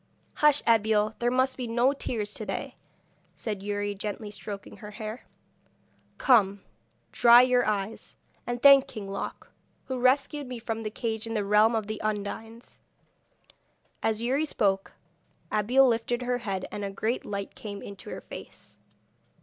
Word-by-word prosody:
'Hush, 300 -1 +4
Abeille! 215 -1 +3
there 240 - +2
must 260 +1 +1
be 250 -2 -4
no 240 +4 +2
tears 215 -6 -3
to 220 - -4
day,' - - -4 0.6
said 210 -4 -4
Youri, 205 0 -2
gently 205 +1 -5
stroking 205 -1 -8
her 210 - -9
hair. 215 +2 -7 0.9
'Come, 200 -6 +3 0.5
dry 240 +1 +7
your 250 -2 +3
eyes, 210 +1 -3 0.3
and 240 0 -2
thank 275 -1 +8
King 210 -3 -7
Loc, 195 0 -6 0.3
who 260 -1 -3
rescued 275 +3 +2
me 250 -1 -5
from 225 -1 -4
the 215 - -3
cage 220 0 -3
in 225 - -4
the 205 -2 0
realm 210 +3 +4
of 220 -2 -1
the 215 0 -5
Undines.' 215 +2 -5 1.2
As 220 0 0
Youri 265 +5 +1
spoke 195 -9 0 0.6
Abeille 245 +6 +4
lifted 240 +1 0
her 245 0 -1
head, 195 -5 -3
and 205 - -5
a 200 - -2
great 220 +5 -2
light 200 -1 -5
came 205 -2 -8
into 200 -1 -9
her - - -6
face. - - -12
220 Hz, 155 wpm, -27 LUFS, 205-245 Hz, 1.2 s, thank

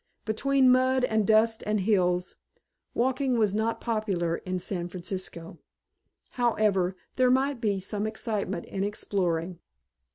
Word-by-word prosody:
Between 260 +4 +3
mud 255 0 +3
and 220 -4 +1
dust 220 +1 +3
and 210 0 +1
hills, 180 -3 +1 0.6
walking 255 +1 +1
was 210 -3 +2
not 225 +2 0
popular 195 -7 -1
in 185 0 -4
San 175 -1 -3
Francisco. 175 -2 -6 0.7
However, 210 -6 +1 0.2
there 255 -1 +4
might 265 0 +1
be 205 -3 +1
some 205 +3 -3
excitement 210 -4 -3
in 195 - -3
exploring. 180 -4 -2
215 Hz, 125 wpm, -27 LUFS, 185-235 Hz, 0.7 s, there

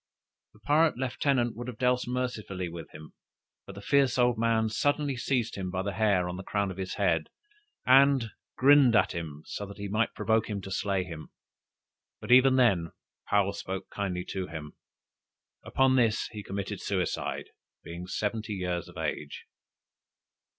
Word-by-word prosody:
The 105 - -21
pirate 155 +3 +3
lieutenant 130 -1 0
would 120 +2 -7
have 125 -3 -6
dealt 125 -1 +1
mercifully 120 -7 -3
with 85 -1 -8
him, 75 0 -12 0.5
but 100 - -9
the 100 - -10
fierce 135 0 +3
old 125 -1 +3
man 115 -1 +1
suddenly 145 +5 0
seized 125 -2 -1
him 95 -2 -4
by 95 0 -2
the 100 0 -3
hair 100 -3 +2
on 90 0 -5
the 95 - -7
crown 100 0 -1
of 95 - -9
his 95 -1 -4
head, 85 -6 +1 0.6
and 135 -3 +5 0.3
grinned 135 -2 +6
at - - +4
him, 80 -3 -6
so 100 - -5
that 100 - -11
he 100 0 -5
might 110 +3 0
provoke 110 0 +1
him 105 -1 -2
to 95 - -8
slay 95 0 0
him. 85 -3 -9 0.9
But - - -5
even 130 +1 +7
then 95 -11 +3 0.4
Paou 100 -1 +3
spoke 95 -1 -6
kindly 90 -3 -3
to 95 -1 -3
him. 75 -1 -8 0.9
Upon 130 0 +2
this 115 -4 +2
he 105 - -7
committed 100 0 -5
suicide, 95 -3 -2 0.3
being 85 +2 -8
seventy 105 +2 -2
years 90 -2 -3
of 90 - -13
age. 75 -2 -4
105 Hz, 165 wpm, -28 LUFS, 90-125 Hz, 0.9 s, even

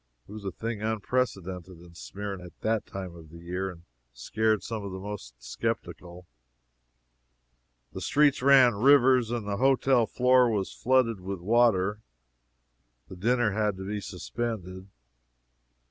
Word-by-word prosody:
It - - -14
was 105 -1 -9
a 95 - -2
thing 115 +3 -5
unprecedented 100 -5 -2
in 85 0 -15
Smyrna 100 +1 -7
at 90 - -15
that 110 -1 -1
time 95 -3 -7
of 80 -2 -13
the 85 - -12
year, 90 +3 -4
and 85 -2 -12 0.3
scared 110 - 0
some 110 -2 -5
of 100 - -6
the 95 - -6
most 95 -12 -8
skeptical. 85 +8 -5 1.7
The - - -6
streets 145 -2 +3
ran 130 -2 +6
rivers 130 +1 +4
and 115 -3 -3
the 100 -1 -2
hotel 130 -1 +3
floor 125 -1 +4
was 100 -4 -2
flooded 120 -4 +1
with 95 0 -5
water. 105 0 +2 1.1
The - - -9
dinner 120 +3 +1
had 105 -1 -1
to 95 - -7
be 105 +1 -4
suspended. 95 -2 -5
105 Hz, 145 wpm, -27 LUFS, 95-120 Hz, 1.7 s, ran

